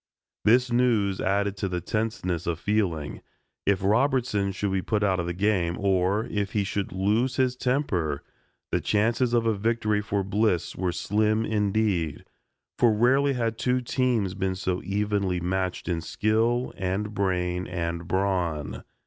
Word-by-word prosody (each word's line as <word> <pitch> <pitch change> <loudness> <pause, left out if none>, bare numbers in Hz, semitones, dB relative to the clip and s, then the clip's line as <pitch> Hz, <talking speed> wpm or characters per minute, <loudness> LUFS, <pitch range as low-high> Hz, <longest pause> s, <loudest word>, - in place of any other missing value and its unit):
This 125 +3 +4
news 115 -6 +2
added 100 +1 +1
to 100 - -2
the 90 -1 -2
tenseness 90 -3 -2
of 85 -2 -1
feeling. 90 -8 -1 0.5
If 100 -1 +2
Robertson 110 -2 +2
should 100 +1 -2
be 95 0 0
put 105 +2 0
out 95 -3 +2
of 85 - -2
the 85 - -2
game, 90 -3 +1
or 100 +2 +1
if 100 -4 -3
he 105 - +1
should 100 0 -3
lose 105 +8 +1
his 130 -2 +1
temper 100 - -1 0.5
the - - +1
chances 115 +4 +1
of 115 -1 +2
a 115 - +3
victory 110 0 0
for 100 -2 -1
Bliss 95 -3 0
were 90 -1 -1
slim 110 +4 +1
indeed, 105 -6 0 0.5
for 120 - +5
rarely 130 +6 +3
had 115 -3 -2
two 125 0 +1
teams 120 -6 0
been 95 0 -1
so 90 -1 -2
evenly 100 -2 0
matched 90 +1 -2
in 85 -3 -1
skill 110 +9 0
and 95 +3 -2
brain 90 -2 -1
and 85 -1 -3
brawn. 90 -5 -1
100 Hz, 155 wpm, -26 LUFS, 90-110 Hz, 0.5 s, for